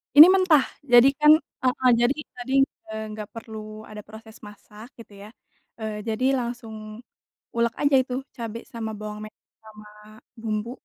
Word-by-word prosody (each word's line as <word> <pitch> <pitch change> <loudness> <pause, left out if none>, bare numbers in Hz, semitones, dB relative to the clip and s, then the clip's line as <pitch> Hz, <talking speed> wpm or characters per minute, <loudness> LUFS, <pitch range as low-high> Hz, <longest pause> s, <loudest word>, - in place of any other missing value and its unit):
Ini 305 +4 +12
mentah. 370 -7 +4 0.2
Jadi 245 -1 +6
kan 300 0 +7 0.3
ah 255 - +4
hah 255 -1 +4
jadi 240 +2 +3 0.2
tadi, 250 +2 -5 0.4
eee, 220 0 -5
nggak 210 -1 -7
perlu 215 -1 -9
ada 210 -1 -10
proses 220 +1 -14
masak 210 +2 -14
gitu 225 -3 -13
ya. 210 - -11 0.5
eee, 215 -1 -5
jadi 225 +4 -1
langsung 235 -2 -6 0.8
ulek 235 0 +1
aja 285 -1 +4
itu 250 -1 -6 0.2
cabe 230 -1 -5
sama 225 -2 -5
bawang 210 0 -7
me - - -8 0.4
sama 215 -1 -14 0.5
bumbu, 220 0 -3
225 Hz, 155 wpm, -24 LUFS, 215-250 Hz, 0.8 s, Ini